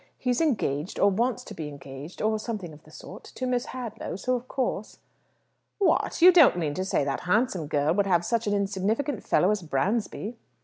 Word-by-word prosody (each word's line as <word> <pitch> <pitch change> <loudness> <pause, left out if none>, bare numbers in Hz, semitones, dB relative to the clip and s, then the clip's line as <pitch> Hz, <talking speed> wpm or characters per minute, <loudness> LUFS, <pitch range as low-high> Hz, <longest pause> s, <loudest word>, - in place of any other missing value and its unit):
He's 250 +1 0
engaged, 185 - 0
or 200 - +5
wants 245 +5 0
to - - -9
be 155 -2 -6
engaged, 140 +4 -9
or 220 0 +1
something 210 -7 -5
of 150 - -15
the - - -17
sort, - - -11
to 255 - -6
Miss 250 0 -1
Hadlow, 245 -8 -6
so 255 +7 -1
of 250 0 -3
course 245 -6 -3 0.4
" - - -45 0.3
"What? 390 -3 +1
You 365 - +11
don't 325 - +6
mean 155 -4 -1
to 185 - -2
say 190 - 0
that 140 -1 -1
handsome 185 - 0
girl 145 +1 +1
would 200 +1 +1
have 175 -2 +2
such 230 +1 0
an 205 - +1
insignificant 205 +6 -1
fellow 185 - +3
as 210 -2 -1
Bransby?" 205 - -2
205 Hz, 205 wpm, -26 LUFS, 165-245 Hz, 0.4 s, You